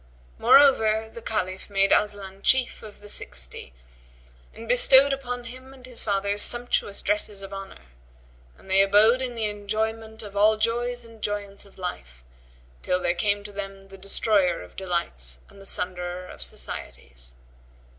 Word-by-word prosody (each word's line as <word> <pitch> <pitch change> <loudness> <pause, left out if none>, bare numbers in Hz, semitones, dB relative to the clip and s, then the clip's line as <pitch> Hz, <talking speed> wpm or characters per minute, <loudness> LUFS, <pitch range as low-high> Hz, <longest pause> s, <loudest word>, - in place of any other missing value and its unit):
Moreover, 220 -6 +5
the 230 - -8
Caliph 190 -4 -3
made 195 -1 +3
Aslan 200 -2 +1
Chief 260 +2 +2
of 210 -2 -12
the 205 - -11
Sixty - - -4 0.8
and 230 - -11
bestowed 265 +3 +6
upon 245 -2 -4
him 260 +3 -11
and 255 -1 -13
his 250 -2 -8
father 200 0 -1
sumptuous 240 -3 -1
dresses 210 -1 -1
of 195 0 -8
honour; 195 0 -9 0.7
and - - -19
they 190 +1 +5
abode 210 +6 +5
in 250 -2 -3
the 225 -2 -1
enjoyment 220 +2 -3
of 205 -1 -10
all 215 +2 +4
joys 240 +2 -1
and 225 -1 -16
joyance 205 -1 -3
of 195 - -21
life, 65 - -7 0.6
till 180 - 0
there 175 - +1
came 205 +3 0
to 205 - -9
them 195 -1 -7
the 195 - -12
Destroyer 195 - +2
of 90 - -15
delights 65 - -2
and 200 - -16
the 195 - -5
Sunderer 180 0 -2
of 70 - -12
societies. - - -7
205 Hz, 155 wpm, -25 LUFS, 190-225 Hz, 0.8 s, bestowed